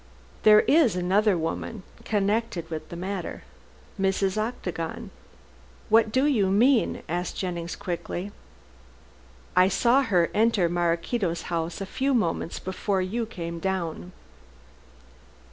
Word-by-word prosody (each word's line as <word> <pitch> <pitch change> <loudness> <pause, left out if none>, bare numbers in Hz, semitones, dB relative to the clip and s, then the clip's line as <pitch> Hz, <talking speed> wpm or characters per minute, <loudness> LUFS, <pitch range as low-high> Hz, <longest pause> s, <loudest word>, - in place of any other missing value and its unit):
"There 215 0 +7
is 285 - +4
another 190 +2 +2
woman 175 +5 -4 0.2
connected 205 -4 0
with 155 -1 -5
the - - -7
matter 185 +1 -5 0.6
Mrs. 190 0 +1
Octagon." 215 -7 -4 0.8
"What 220 0 +4
do 260 +4 +2
you 235 -10 +3
mean?" 230 +6 +3
asked 175 +2 -3
Jennings 175 -2 -3
quickly. 180 +2 -5 1.2
"I 180 0 +6
saw 235 +7 +3
her 185 -10 +2
enter 215 -5 +3
Maraquito's 170 +2 -1
house 165 +3 -2
a - - -2
few 270 +7 0
moments 170 -6 -1
before 190 +1 -2
you 225 +5 -2
came 170 -5 -6
down." 170 - -3
190 Hz, 115 wpm, -26 LUFS, 175-220 Hz, 1.2 s, There